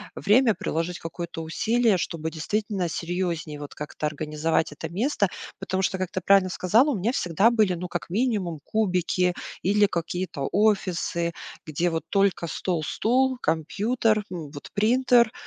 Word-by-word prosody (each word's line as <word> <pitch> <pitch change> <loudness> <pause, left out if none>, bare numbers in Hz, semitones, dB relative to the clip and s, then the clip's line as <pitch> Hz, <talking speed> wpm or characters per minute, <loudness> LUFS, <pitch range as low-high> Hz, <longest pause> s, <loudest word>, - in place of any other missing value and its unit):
время, 225 +3 +4
приложить 165 +2 -2
какое-то 165 0 -6
усилие, 220 +6 +2
чтобы 160 -1 -3
действительно 195 +2 -2
серьёзнее 170 -3 -3
вот 145 -1 -8
как-то 150 +1 -5
организовать 155 +1 -1
это 155 +2 -6
место. 205 - 0 0.3
Потому 190 +1 -2
что, 190 - 0
как 185 -2 -2
ты 185 - -3
правильно 195 0 +4
сказала, 220 - +3
у - - 0
меня 215 +7 0
всегда 195 +1 +2
были, 215 -6 +3
ну, 180 +1 -5
как 175 - -4
минимум 200 - 0
кубики 180 -3 +1 0.3
или 205 +2 +4
какие-то 170 -5 -3 0.2
офисы, 170 -4 -1 0.3
где 165 +3 0
вот 165 -2 -2
только 195 -3 +2
стол, 170 -1 -2
стул, 255 - +1
компьютер, 215 +7 +1
м, 160 -5 -6
вот 145 -1 -9
принтер 240 +2 +4
180 Hz, 145 wpm, -25 LUFS, 165-215 Hz, 0.3 s, время